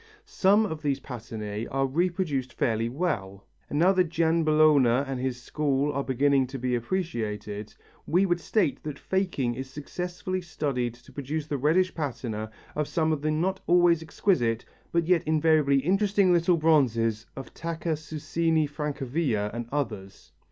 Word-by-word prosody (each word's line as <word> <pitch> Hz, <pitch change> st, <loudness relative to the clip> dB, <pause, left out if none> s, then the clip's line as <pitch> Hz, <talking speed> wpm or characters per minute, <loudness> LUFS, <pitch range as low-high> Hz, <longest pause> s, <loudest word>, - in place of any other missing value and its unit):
Some 210 Hz, -, +3 dB
of 160 Hz, -6 st, -5 dB
these 140 Hz, -3 st, 0 dB
patinæ 110 Hz, -4 st, -6 dB
are 135 Hz, 0 st, 0 dB
reproduced 155 Hz, -3 st, -1 dB
fairly 115 Hz, -1 st, 0 dB
well, 100 Hz, -, -3 dB, 0.2 s
and 145 Hz, -, -2 dB
now 175 Hz, +5 st, +5 dB
that 185 Hz, -3 st, +2 dB
Gianbologna 155 Hz, -5 st, +3 dB
and 135 Hz, -2 st, -3 dB
his 125 Hz, -1 st, -2 dB
school 145 Hz, +2 st, 0 dB
are 140 Hz, 0 st, -1 dB
beginning 135 Hz, 0 st, +2 dB
to 135 Hz, +2 st, -6 dB
be 125 Hz, 0 st, -1 dB
appreciated, 110 Hz, -, -3 dB, 0.4 s
we 180 Hz, +4 st, +3 dB
would 175 Hz, -2 st, +1 dB
state 175 Hz, -1 st, 0 dB
that 150 Hz, -2 st, -6 dB
faking 175 Hz, -11 st, -1 dB
is 130 Hz, +2 st, -6 dB
successfully 180 Hz, +6 st, -4 dB
studied 135 Hz, -8 st, -2 dB
to 120 Hz, -, -18 dB
produce 145 Hz, +2 st, -4 dB
the 145 Hz, -2 st, -3 dB
reddish 175 Hz, +7 st, +2 dB
patina 120 Hz, -8 st, -4 dB, 0.3 s
of 150 Hz, -1 st, -1 dB
some 160 Hz, -1 st, +1 dB
of 150 Hz, -, -3 dB
the 155 Hz, -, 0 dB
not 180 Hz, +5 st, 0 dB
always 175 Hz, -2 st, +4 dB
exquisite 130 Hz, -, 0 dB, 0.3 s
but 170 Hz, -1 st, +1 dB
yet 175 Hz, -1 st, +3 dB
invariably 155 Hz, -3 st, +3 dB
interesting 195 Hz, +3 st, +3 dB
little 170 Hz, 0 st, +3 dB
bronzes 115 Hz, -9 st, +2 dB
of 135 Hz, -, -8 dB
Tacca 165 Hz, 0 st, -4 dB
Susini 160 Hz, +1 st, -1 dB
Francavilla 140 Hz, -6 st, -2 dB
and 120 Hz, 0 st, -4 dB
others. 110 Hz, -9 st, -4 dB
150 Hz, 150 wpm, -27 LUFS, 125-170 Hz, 0.4 s, now